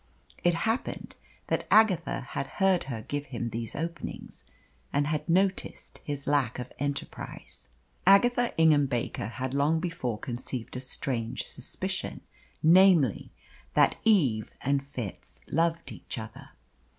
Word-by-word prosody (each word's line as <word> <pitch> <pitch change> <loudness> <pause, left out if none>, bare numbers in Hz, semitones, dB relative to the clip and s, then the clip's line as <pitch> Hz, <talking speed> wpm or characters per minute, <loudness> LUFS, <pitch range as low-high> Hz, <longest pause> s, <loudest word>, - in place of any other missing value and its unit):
It 175 -1 +4
happened 225 +8 -2 0.3
that - - -1
Agatha 205 -6 +4
had 135 - -3
heard 190 -5 +3
her 115 -5 -5
give 145 +3 -4
him 120 -2 -4
these 115 0 -3
openings, 170 +2 -5 0.5
and 145 0 +2
had 155 +3 -2
noticed 190 +2 0
his 145 -1 -4
lack 140 -5 +1
of 125 0 -6
enterprise. 140 0 -5 0.3
Agatha 240 +5 +5
Ingham 155 -3 +5
Baker 120 -4 -2
had 125 +4 -4
long 145 +3 +2
before 165 -10 -2
conceived 120 +1 -4
a - - -2
strange 130 -3 -3
suspicion - - -3 0.4
namely, 170 - +5 0.5
that - - +4
Eve 140 - +3
and 140 0 +1
Fitz 120 -8 -7
loved 165 +1 0
each - - -7
other. 110 -1 -8
145 Hz, 125 wpm, -29 LUFS, 125-170 Hz, 0.5 s, Agatha